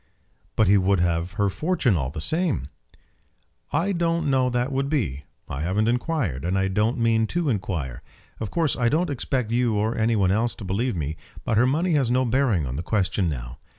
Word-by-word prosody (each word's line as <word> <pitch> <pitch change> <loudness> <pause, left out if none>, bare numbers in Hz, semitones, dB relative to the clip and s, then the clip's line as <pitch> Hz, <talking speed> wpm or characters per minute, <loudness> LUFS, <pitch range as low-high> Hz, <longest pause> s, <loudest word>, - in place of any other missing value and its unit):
"But 110 - +3
he 100 +1 +5
would 95 0 +2
have 85 0 0
her 100 0 +1
fortune 155 - +1
all 70 -5 -1
the 75 +2 -6
same?" 155 - -1 1.0
"I 165 +7 +1
don't 170 -4 0
know 130 -1 +3
how - - +1
that 125 +2 -1
would 135 +1 -1
be. 75 - -1 0.2
I 70 - -4
haven't 95 +7 +1
inquired, 120 - -1
and 90 +2 0
I 95 0 +1
don't 105 +5 +1
mean 115 -1 +2
to 170 +1 -1
inquire. 85 - -3 0.4
Of 110 - -3
course 160 - +1
I 120 -1 +2
don't 160 +3 +1
expect 125 -3 -2
you 120 -2 +2
or 110 +3 0
any 115 +1 +1
one 95 -3 +2
else 115 +4 +1
to - - -9
believe 105 +5 -1
me, 80 -1 -3 0.3
but 110 - +1
her 125 - +4
money 165 +7 +1
has 135 -5 +2
no 130 +1 +2
bearing 120 - +1
on 65 +1 -4
the - - -2
question 90 0 0
now. 60 -3 -6
110 Hz, 210 wpm, -24 LUFS, 90-135 Hz, 1.0 s, he